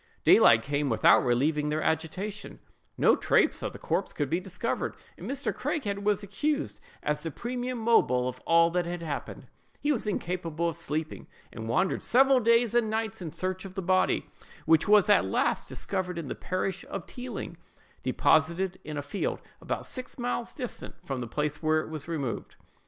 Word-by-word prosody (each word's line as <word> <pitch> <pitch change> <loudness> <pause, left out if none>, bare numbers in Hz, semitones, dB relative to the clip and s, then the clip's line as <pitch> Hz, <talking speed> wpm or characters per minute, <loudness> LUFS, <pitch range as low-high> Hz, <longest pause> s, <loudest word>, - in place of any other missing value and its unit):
Daylight 115 -1 +7
came 145 0 -1
without 115 - +5
relieving 145 +5 +1
their 155 +1 -1
agitation; 180 +6 -3 0.4
no - - +5
trace - - +2
of - - -3
the - - -9
corpse - - -2
could 145 -2 -2
be 170 - +2
discovered, 190 +5 -3 0.2
and - - -8
Mr. 280 +1 -1
Craighead 205 -11 -2
was 205 0 +1
accused 290 +10 -2 0.2
as 150 0 -1
the 165 - -3
primum 245 - -4
mobile 175 - +3
of 130 0 -5
all 165 0 +5
that 175 0 0
had 175 0 -4
happened: 150 -3 -5 0.3
he 295 - +1
was 235 -6 -1
incapable 170 -4 -2
of 165 - -2
sleeping, 155 +1 -4 0.3
and 110 0 -6
wandered 185 +11 +1
several 265 +1 +5
days 230 0 +3
and 240 -2 +2
nights 220 -1 -2
in 165 -3 -5
search 185 +3 -3
of 190 -1 -9
the 195 - -2
body, 185 +1 +2 0.4
which 160 0 +4
was 210 -1 +6
at 205 - +5
last 95 - 0
discovered 185 -3 -3
in 160 -5 -5
the - - -2
parish 185 0 -3
of 195 -4 -5
Tealing, 250 0 -7 0.4
deposited 170 +4 +2
in 150 0 -6
a 145 - -3
field, 145 +8 -2 0.2
about - - -3
six 255 -1 -6
miles 240 -1 -2
distant 250 -4 -6
from 135 -5 -3
the 120 - -4
place 150 +4 -2
whence 155 0 +2
it - - -10
was 155 -1 -6
removed. 145 -8 -4
180 Hz, 180 wpm, -28 LUFS, 150-215 Hz, 0.4 s, Daylight